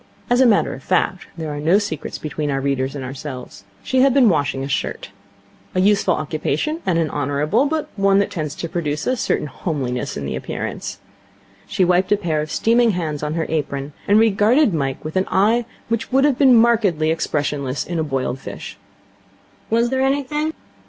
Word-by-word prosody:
As 245 Hz, +1 st, +4 dB
a 260 Hz, -, +6 dB
matter 215 Hz, -3 st, +3 dB
of -, -, -9 dB
fact -, -, 0 dB
there 160 Hz, -2 st, -4 dB
are 145 Hz, -, -4 dB
no 165 Hz, +6 st, +4 dB
secrets 205 Hz, -8 st, -4 dB
between 150 Hz, 0 st, -4 dB
our 135 Hz, -1 st, 0 dB
readers 135 Hz, 0 st, -1 dB
and 135 Hz, -2 st, -5 dB
ourselves 130 Hz, -6 st, -8 dB, 0.2 s
she 260 Hz, 0 st, +2 dB
had 270 Hz, -1 st, +4 dB
been 255 Hz, -5 st, +6 dB
washing 140 Hz, -5 st, 0 dB
a -, -, -3 dB
shirt. 140 Hz, -, -3 dB, 0.6 s
A -, -, +2 dB
useful 205 Hz, +2 st, +3 dB
occupation, 315 Hz, +2 st, -2 dB
and 175 Hz, -3 st, +2 dB
an 165 Hz, -2 st, 0 dB
honourable, 145 Hz, -, +1 dB
but 315 Hz, +1 st, -2 dB
one 195 Hz, -1 st, +3 dB
that 200 Hz, -, +1 dB
tends 155 Hz, -3 st, -4 dB
to 170 Hz, -, -4 dB
produce 150 Hz, -3 st, -3 dB
a 255 Hz, -, +1 dB
certain 235 Hz, -, -1 dB
homeliness 135 Hz, -5 st, -3 dB
in 70 Hz, -, -4 dB
the -, -, -3 dB
appearance. -, -, -5 dB, 0.7 s
She 195 Hz, -2 st, +1 dB
wiped 180 Hz, +2 st, +2 dB
a 205 Hz, -, +5 dB
pair 160 Hz, -5 st, -1 dB
of 155 Hz, -, -5 dB
steaming 230 Hz, +5 st, +3 dB
hands 155 Hz, -4 st, -3 dB
on 150 Hz, +1 st, -2 dB
her 165 Hz, -1 st, -1 dB
apron, 145 Hz, -2 st, -3 dB
and 205 Hz, +1 st, +5 dB
regarded 220 Hz, -, +4 dB
Mike 135 Hz, -3 st, -2 dB
with 155 Hz, -, -5 dB
an 185 Hz, -, +1 dB
eye 225 Hz, +5 st, +3 dB, 0.2 s
which 230 Hz, +1 st, -2 dB
would 270 Hz, +1 st, +4 dB
have 285 Hz, -4 st, +1 dB
been 265 Hz, -4 st, +7 dB
markedly 210 Hz, -9 st, +3 dB
expressionless 145 Hz, -4 st, -2 dB
in 170 Hz, -1 st, -3 dB
a -, -, +1 dB
boiled 135 Hz, -3 st, -2 dB
fish. -, -, -8 dB, 0.9 s
'Was 235 Hz, +2 st, +2 dB
there 265 Hz, 0 st, +1 dB
anything?' 285 Hz, +3 st, 0 dB
170 Hz, 195 wpm, -20 LUFS, 145-230 Hz, 0.9 s, been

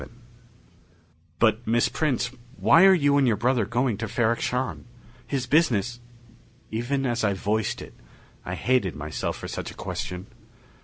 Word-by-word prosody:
VII -, -, -10 dB, 1.3 s
"But, 110 Hz, 0 st, +2 dB
Miss 115 Hz, +1 st, +3 dB
Prince, 130 Hz, -5 st, -1 dB, 0.3 s
why 170 Hz, +4 st, +6 dB
are 190 Hz, -, +8 dB
you 145 Hz, -4 st, +3 dB
and 135 Hz, -2 st, +3 dB
your 115 Hz, -, +3 dB
brother 120 Hz, 0 st, +1 dB
going 120 Hz, -2 st, 0 dB
to 115 Hz, -, -3 dB
Ferrok 115 Hz, 0 st, +1 dB
Shahn? 125 Hz, +1 st, -2 dB, 0.4 s
His 135 Hz, -3 st, -2 dB
business 120 Hz, -, +2 dB, 0.4 s
" -, -, -28 dB, 0.3 s
Even 125 Hz, +5 st, -1 dB
as 120 Hz, -2 st, -1 dB
I 100 Hz, -2 st, +2 dB
voiced 110 Hz, +4 st, -1 dB
it, -, -, -12 dB, 0.5 s
I -, -, -4 dB
hated 125 Hz, -8 st, +1 dB
myself 75 Hz, +1 st, -4 dB
for -, -, -7 dB
such -, -, -5 dB
a -, -, -11 dB
question. 90 Hz, +1 st, -5 dB
120 Hz, 160 wpm, -25 LUFS, 110-130 Hz, 1.3 s, are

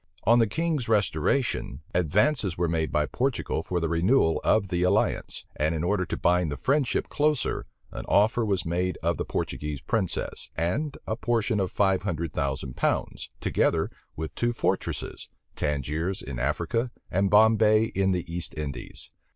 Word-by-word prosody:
On 115 Hz, +3 st, +5 dB
the 115 Hz, -, +4 dB
king's 155 Hz, -2 st, -1 dB
restoration, 100 Hz, -, 0 dB
advances 95 Hz, -, +2 dB
were 85 Hz, 0 st, +1 dB
made 80 Hz, -2 st, 0 dB
by 75 Hz, -, +2 dB
Portugal 125 Hz, -, -1 dB
for 90 Hz, +2 st, -2 dB
the 85 Hz, -, 0 dB
renewal 85 Hz, +2 st, +2 dB
of 100 Hz, -3 st, +2 dB
the 90 Hz, -2 st, 0 dB
alliance; 95 Hz, +4 st, +1 dB
and 80 Hz, +3 st, +1 dB
in 80 Hz, -, -2 dB
order 95 Hz, 0 st, 0 dB
to -, -, -3 dB
bind 90 Hz, -2 st, +2 dB
the 70 Hz, -, -3 dB
friendship 140 Hz, -1 st, +1 dB
closer, 150 Hz, -2 st, 0 dB, 0.2 s
an -, -, -6 dB
offer 110 Hz, +4 st, +3 dB
was 100 Hz, -5 st, 0 dB
made 90 Hz, +2 st, -1 dB
of -, -, +1 dB
the -, -, -2 dB
Portuguese 75 Hz, -2 st, -3 dB
princess, 95 Hz, -, -2 dB
and 135 Hz, -, -1 dB
a 110 Hz, -, -1 dB
portion 115 Hz, -2 st, 0 dB
of 95 Hz, -2 st, -1 dB
five 95 Hz, -2 st, +2 dB
hundred 85 Hz, -5 st, -3 dB
thousand 65 Hz, -3 st, -2 dB
pounds, -, -, -1 dB
together -, -, +1 dB, 0.2 s
with 80 Hz, 0 st, -5 dB
two 120 Hz, 0 st, 0 dB
fortresses, -, -, -2 dB, 0.3 s
Tangiers 75 Hz, +6 st, -2 dB
in 65 Hz, -2 st, -5 dB
Africa, 120 Hz, +1 st, 0 dB, 0.2 s
and 95 Hz, +1 st, +2 dB
Bombay 110 Hz, +1 st, +5 dB
in 95 Hz, 0 st, +2 dB
the 90 Hz, -2 st, -1 dB
East 85 Hz, -1 st, -5 dB
Indies. 70 Hz, -4 st, -6 dB
95 Hz, 160 wpm, -27 LUFS, 80-110 Hz, 0.3 s, On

